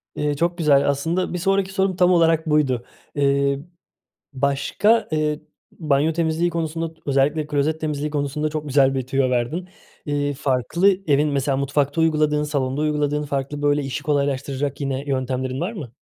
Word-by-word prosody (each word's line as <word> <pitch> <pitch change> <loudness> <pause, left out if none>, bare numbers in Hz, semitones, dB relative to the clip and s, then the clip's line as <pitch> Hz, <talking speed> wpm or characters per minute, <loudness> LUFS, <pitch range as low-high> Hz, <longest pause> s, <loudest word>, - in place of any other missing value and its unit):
Iıı, 150 0 -1
çok 170 +4 0
güzel. 140 -4 +3
Aslında 165 +7 -1
bir - - -1
sonraki 195 +1 0
sorum 190 -1 +1
tam 180 0 +4
olarak 165 -2 +3
buydu, 135 -5 +1 0.3
ııı, 140 0 +2 0.7
başka, 140 - +1
ııı, 150 -1 0 0.3
banyo 150 -1 +1
temizliği 165 +1 0
konusunda, 165 0 -3
özellikle 145 +2 +1
klozet 150 +1 0
temizliği 150 -1 -2
konusunda 145 +1 -1
çok 150 0 -4
güzel 135 -1 +3
bir 130 -2 -2
tüyo 135 0 +1
verdin, 130 +9 -1 0.4
ııı, 145 0 0
farklı 135 - +1 0.2
evin 150 0 +3
mesela 140 -1 0
mutfakta 140 +2 0
uyguladığın, 155 -2 +2
salonda 140 -2 -1
uyguladığın 150 -1 0
farklı, 140 0 -3
böyle, 145 0 +2
işi 135 0 -4
kolaylaştıracak 140 -1 -1
yine 135 -1 -2
yöntemlerin 130 -1 -2
var 180 +6 -2
mı? 145 - -8
145 Hz, 155 wpm, -22 LUFS, 140-160 Hz, 0.7 s, tam